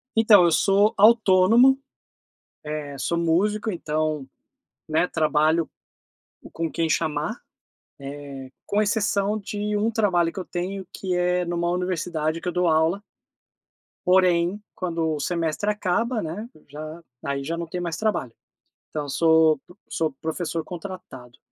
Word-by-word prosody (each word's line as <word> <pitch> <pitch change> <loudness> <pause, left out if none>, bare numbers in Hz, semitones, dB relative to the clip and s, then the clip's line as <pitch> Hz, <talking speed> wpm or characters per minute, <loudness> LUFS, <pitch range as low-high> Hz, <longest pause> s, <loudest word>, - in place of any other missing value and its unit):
Então, 215 -4 +7
eu 170 - +3
sou 200 +4 +4
autônomo, 225 +4 +6 0.9
eh, 145 -2 -5
sou 170 +5 -1
músico, 205 +6 +1
então, 155 -3 -2 0.7
né, 160 +3 +2
trabalho 155 0 +2 0.8
com 165 -1 -3
quem 165 -1 -1
chamar. 155 -1 -1 1.0
Eh, 130 - -11 0.2
com 205 +1 +1
exceção 210 -1 +1
de 210 +1 -3
um 220 +2 +1
trabalho 180 -6 +1
que - - -6
eu 185 - -5
tenho 185 +1 -4
que 185 -2 -3
é 180 0 +1
numa 170 0 -1
universidade 170 -3 -1
que - - -6
eu - - +1
dou 180 0 +1
aula. 160 +4 +2 1.1
Porém, 180 +1 +3
quando 165 -3 -1
o 150 - -5
semestre 170 +4 -1
acaba, 215 +4 0
né, 190 +9 -5 0.2
já 155 +3 -8 0.2
aí 140 0 -2
já 165 +4 -3
não 170 0 -4
tem 180 +2 -4
mais 170 -2 -3
trabalho. 210 - -1 0.6
Então 150 -1 -3
eu - - -9
sou 160 0 +4 0.3
sou 160 -1 -1
professor 165 +1 -3
contratado, 165 -9 -9
175 Hz, 135 wpm, -24 LUFS, 160-200 Hz, 1.1 s, Então